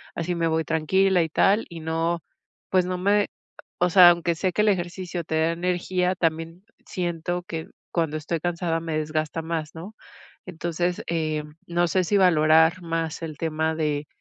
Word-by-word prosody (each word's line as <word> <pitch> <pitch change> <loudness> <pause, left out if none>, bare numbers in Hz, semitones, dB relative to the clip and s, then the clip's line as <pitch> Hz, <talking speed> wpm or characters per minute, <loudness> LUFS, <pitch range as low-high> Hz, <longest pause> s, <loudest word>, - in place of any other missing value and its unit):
así 170 +1 -2
me 165 -1 0
voy 160 0 +1
tranquila 180 +4 +2
y 160 - -4
tal, 200 +7 +3
y 170 - -9
no, 165 +1 -1 0.5
pues 185 -1 +3
no 180 0 -2
me", 200 +2 +2 0.5
o 180 - +3
sea, 180 0 +9
aunque 170 -1 +1
sé 185 +3 -1
que - - +2
el 210 - +4
ejercicio 175 -1 -2
te 160 - -3
da 160 +1 +2
energía, 180 +1 0
también 165 +1 -2 0.2
siento 175 0 -3
que 165 -2 -6 0.2
cuando 160 -3 0
estoy 155 +2 -3
cansada 170 0 -1
me 165 -1 -3
desgasta 155 +1 -2
más, 160 -2 -4
¿no?, 175 +6 -9 0.5
entonces, 175 0 -2
em, 155 -2 -2
no 175 0 +1
sé 185 +2 +1
si 200 +4 +1
valorar 160 -1 +4
más 165 -1 -3
el 155 -3 -6
tema 160 0 -1
de, 150 -2 -1
170 Hz, 175 wpm, -24 LUFS, 160-180 Hz, 0.5 s, sea